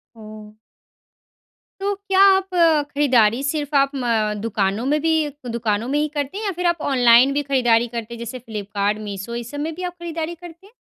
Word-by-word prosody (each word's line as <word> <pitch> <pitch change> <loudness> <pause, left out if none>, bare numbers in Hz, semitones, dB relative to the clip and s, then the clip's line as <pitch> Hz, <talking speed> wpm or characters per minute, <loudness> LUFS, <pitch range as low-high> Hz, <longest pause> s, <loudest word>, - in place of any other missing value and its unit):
हुँ। 215 -1 -12 1.2
तो 400 +1 -1
क्या 390 -1 -1
आप 385 0 +2 0.5
खरीदारी 250 -5 +3
सिर्फ़ 290 0 -2
आप 275 0 +3
म 230 -5 0
दुकानों 210 0 -1
में 295 +3 +1
भी 325 +1 +2 0.4
दुकानों 225 -1 -1
में 285 - 0
ही 300 - +1
करती 290 +5 -3
हैं 435 - -4
या 400 - 0
फिर 360 - -2
आप 340 -2 0
ऑनलाइन 250 +1 +5
भी 290 +1 0
खरीदारी 240 -3 +3
करते 235 -1 -6
हैं? 235 - -9
जैसे 235 +2 -6
फ्लिपकार्ट, 205 -2 -3
मीशो 200 +3 -6
ये 240 - -4
सब 290 +5 -8
में 315 +2 -3
भी 365 - -7
आप 355 -1 -4
खरीदारी 335 0 -4
करते 345 +1 -13
हैं? 420 - -22
255 Hz, 195 wpm, -21 LUFS, 225-320 Hz, 1.2 s, ऑनलाइन